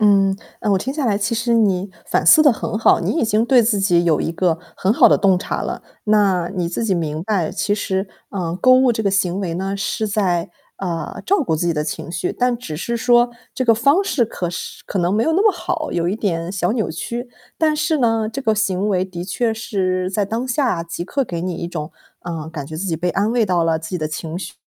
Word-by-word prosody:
嗯， 195 -2 +4 0.3
嗯， 210 - +2
我 195 - +3
听 260 +8 -3
下 290 -2 -2
来 210 -3 +2
其 205 +3 -1
实 235 +1 0
你 200 -4 +2 0.2
反 - - 0
思 310 - +8
得 290 -3 +6
很 215 - -3
好， 225 - +4
你 - - -1
已 - - +2
经 220 0 +2
对 245 0 +5
自 215 -2 +1
己 175 -3 +3
有 160 -3 +2
一 165 - -2
个 170 -1 +1 0.2
很 190 - +1
好 - - +6
的 - - +5
洞 190 -2 +3
察 - - -3
了。 - - -4 0.2
那 200 -5 +2
你 175 -3 -1
自 180 +6 -2
己 200 -4 +1
明 155 -2 -2
白， 190 -5 0
其 205 +2 0
实， 190 -1 -2 0.2
嗯， 175 -4 -3
购 255 - +6
物 255 -1 +4
这 220 - -2
个 200 - +1
行 190 -1 0
为 175 -4 -3
呢， 195 +3 -2
是 215 +2 -2
在， 185 -5 0 0.3
呃， 175 -4 -4
照 395 -2 +2
顾 190 - 0
自 160 +2 -1
己 170 - +2
的 150 -1 -1
情 150 +1 -5
绪， 175 +1 -2
但 250 -1 +1
只 160 -11 -6
是 235 +9 -2
说 240 0 +4 0.2
这 260 - -1
个 230 -2 +5
方 280 - +3
式， 280 -10 +1
可 180 -6 -4
是 170 - -7
可 195 - -3
能 175 +1 +1
没 220 - +2
有 320 - +1
那 380 +5 +3
么 430 - +5
好， 350 - -3
有 170 0 0
一 195 - -1
点 170 -5 -2
小 180 0 0
扭 220 -7 -1
曲。 235 +9 -5 0.3
但 310 -1 +2
是 310 0 +1
呢， 225 -3 +1
这 255 +5 -5
个 220 -3 +2
行 200 -1 0
为 185 -2 +1
的 175 -2 -7
确 225 +3 -1
是 185 -4 -1
在 200 +1 0
当 225 +5 -3
下 245 - 0
即 170 +1 -5
刻 275 +7 -1
给 170 -7 -5
你 180 0 -3
一 170 - -4
种， 155 -2 -5 0.3
嗯， 160 -2 -5
感 150 -4 -6
觉 155 +2 -7
自 180 - -3
己 170 -4 -1
被 175 +2 -1
安 205 +5 0
慰 235 -2 +2
到 180 -3 +2
了， 165 -1 +1
自 160 0 -8
己 185 - -1
的 155 - -2
情 155 +1 -5
绪 185 -1 -7
195 Hz, 270 characters per minute, -20 LUFS, 175-230 Hz, 0.3 s, 思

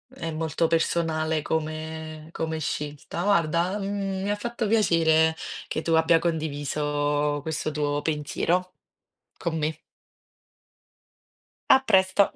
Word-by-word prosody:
è 165 -1 -4
molto 160 +1 0
personale 160 -1 +1
come 155 0 -4
come 160 -1 -2
scelta. 150 +3 -4
Guarda, 175 0 +2
mhmm, 195 -1 -2
mi 200 - -1
ha 205 - +2
fatto 235 +1 -3
piacere 160 -7 +4 0.3
che 155 - -2
tu 165 - 0
abbia 160 0 +5
condiviso 145 -2 -1
questo 155 0 -3
tuo 145 -1 -1
pensiero 170 +4 -1 0.6
con 170 -2 -2
me. 155 +1 -2 1.9
A 265 - +8
presto. 190 -3 +3
160 Hz, 110 wpm, -26 LUFS, 155-180 Hz, 1.9 s, A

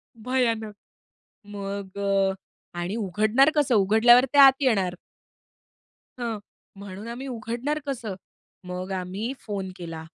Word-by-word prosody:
भयानक. 230 -2 -1 0.7
मग 200 -1 -6
अ, 195 -1 +2 0.5
आणि 175 +5 -3
उघडणार 215 - +3
कसं? 285 -5 +2
उघडल्यावर 220 +5 +6
ते 285 - +2
आत 275 -1 +10
येणार. 195 -9 +2 1.3
हां. 230 -2 -2 0.4
म्हणून 200 +2 -8
आम्ही 245 +4 -6
उघडणार 245 +4 -3
कसं. 240 -8 -4 0.5
मग 180 +1 -5
आम्ही 190 +5 -3
फोन 195 -3 -5
केला 165 -2 -7
215 Hz, 110 wpm, -25 LUFS, 195-245 Hz, 1.3 s, आत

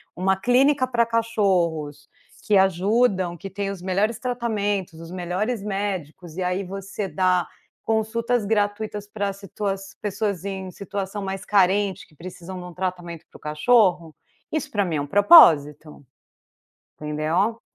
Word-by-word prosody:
uma 190 +2 +1
clínica 255 +5 +3
para 235 -2 +2
cachorros, 180 -11 0 0.4
que 210 - +4
ajudam, 190 -1 +2
que 195 +4 -8
têm 200 +1 -3
os 195 -3 -7
melhores 200 +4 0
tratamentos, 205 -8 -2
os 165 0 -10
melhores 185 +6 -2
médicos, 190 -5 -4
e - - -2
aí 180 +2 -1
você 195 +1 -5
dá 180 +1 +1 0.4
consultas 225 +1 0
gratuitas 210 0 -1
para 200 -1 -2
situa 195 0 -4 0.3
pessoas 205 -3 -2
em 190 -2 -5
situação 200 +1 -5
mais 195 0 -5
carente 195 0 +2
que 155 - -25
precisam 185 +2 -9
de 180 - -8
um 180 - -10
tratamento 175 -3 -5
para - - -14
o - - -25
cachorro, 170 +1 +2 0.4
isso 310 -3 -3
para 205 -2 +1
mim 175 -4 -2
é 145 - 0
um - - -3
propósito. 155 - +5 1.0
Entendeu. 155 +9 -1
195 Hz, 140 wpm, -23 LUFS, 175-210 Hz, 1.0 s, propósito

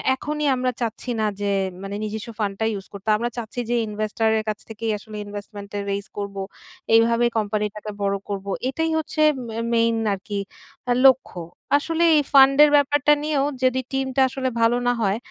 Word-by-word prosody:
এখনই 300 +2 -2
আমরা 255 0 0
চাচ্ছি 230 +2 -3
না 215 - +1 0.2
যে 205 - 0 0.3
মানে 195 +1 -5
নিজেস্ব 215 +1 -5
ফান্ড 205 -2 0
টা 220 - +1
ইউস 195 -1 -6
করতে। 200 +2 -6
আমরা 240 +2 -2
চাচ্ছি 235 +1 -5
যে 240 - +1
investor 215 +1 -1
এর 215 - -1
কাছ 210 - -3
থেকেই 225 0 -3
আসলে 215 +1 -12
investment 205 0 -8
এর 200 - -2
রেইস 200 0 -3
করব, 200 -1 -4 0.6
এইভাবে 230 +1 +4
কোম্পানি 210 0 0
টাকে 210 0 -6
বড় 200 0 +1
করব। 195 -1 -4 0.2
এটাই 320 +4 -1
হচ্ছে 310 0 -2 0.3
মে 225 - -7 0.2
মেইন 230 0 +3 0.2
আরকি 200 +1 -4 0.5
আ - - +5
লক্ষ্য। 260 -8 +2 0.4
আসলে 330 +3 -1
এই - - +5
ফান্ড 275 0 +7
এর 300 - +6
ব্যাপারটা 290 +1 +3
নিয়েও 295 -3 +1 0.2
যদি 260 0 +2
টিম 270 0 -1
টা 270 - +3
আসলে 260 0 -2
ভালো 230 +1 +4
না 245 - +4
হয়, 200 0 +1
225 Hz, 190 wpm, -23 LUFS, 205-265 Hz, 0.6 s, ফান্ড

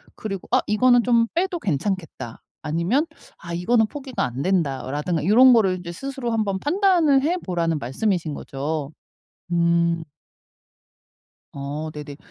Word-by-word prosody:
그리고 195 -4 -6
'아 - - +4
이거는 245 +3 +4
좀 235 -1 +3
빼도 360 +1 0
괜찮겠다.' 175 - -3 0.2
아니면 170 - 0 0.3
'아 170 0 -8
이거는 220 +6 +2
포기가 260 -6 -4
안 125 +2 -4
된다.'라든가 150 -2 -1
요런 250 +6 +7
거를 195 -6 +3
이제 175 -1 -7
스스로 265 +4 -4
한번 210 -4 0
판단을 335 - +3
해보라는 175 - -1
말씀이신 160 - -1
거죠. 145 +2 -4 0.6
음. 170 -1 +2 1.5
어. 145 +3 -5
네네. 145 -1 -8
185 Hz, 285 characters per minute, -23 LUFS, 160-245 Hz, 1.5 s, 요런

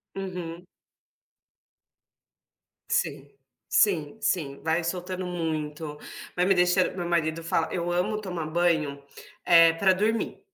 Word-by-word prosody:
Uhum. 180 -3 -6 2.2
Sim. - - -1 0.4
Sim, 170 -4 +2
sim, 145 -9 -1
vai 165 +1 0
soltando 185 +1 -3
muito, 155 -3 -4 0.4
vai 180 - +1
me 195 - +4
deixan 180 +1 +3
meu 175 -2 -3
marido 165 -1 0
fala 165 0 0
eu 175 0 -2
amo 210 +5 0
tomar 180 -5 -4
banho, 155 -4 0 0.4
eh, 165 -1 +7
pra 190 +3 +3
dormir. 215 +4 0
175 Hz, 115 wpm, -26 LUFS, 160-185 Hz, 2.2 s, eh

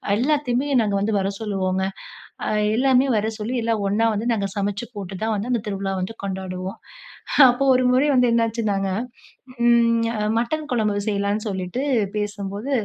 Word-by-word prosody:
எல்லாத்தையுமே 270 +1 +1
நாங்க 205 -2 0
வந்து 215 +2 0
வர 195 0 0
சொல்லுவோங்க. 190 -3 -1 0.6
அ - - -1 0.3
எல்லாமே 260 +1 +4
வர 215 +1 0
சொல்லி, 220 +4 -3
எல்லாம் 225 -2 0
ஒண்ணா 210 +3 +1
வந்து 215 +3 -3
நாங்க 200 -3 -1
சமைச்சு 205 +3 -2
போட்டு 195 -2 -6
தான் 220 0 0
வந்து, 215 +5 -3
அந்த 235 - +1
திருவிழா 195 -1 -2
வந்து 185 +5 -4
கொண்டாடுவோம். 190 -1 -4 0.7
அப்போ 245 +3 +1
ஒரு 255 0 +2
முறை 260 +4 +3
வந்து 250 -1 +4
என்னாச்சுன்னாங்க, 220 -4 0 0.8
ம் 230 -1 +4 0.3
மட்டன் 300 +6 -2
குழம்பு 210 -4 0
செய்யலான்னு 205 +1 -1
சொல்லிட்டு 190 +6 -3 0.4
பேசும்போது 205 +3 -4
215 Hz, 150 wpm, -22 LUFS, 200-240 Hz, 0.8 s, எல்லாமே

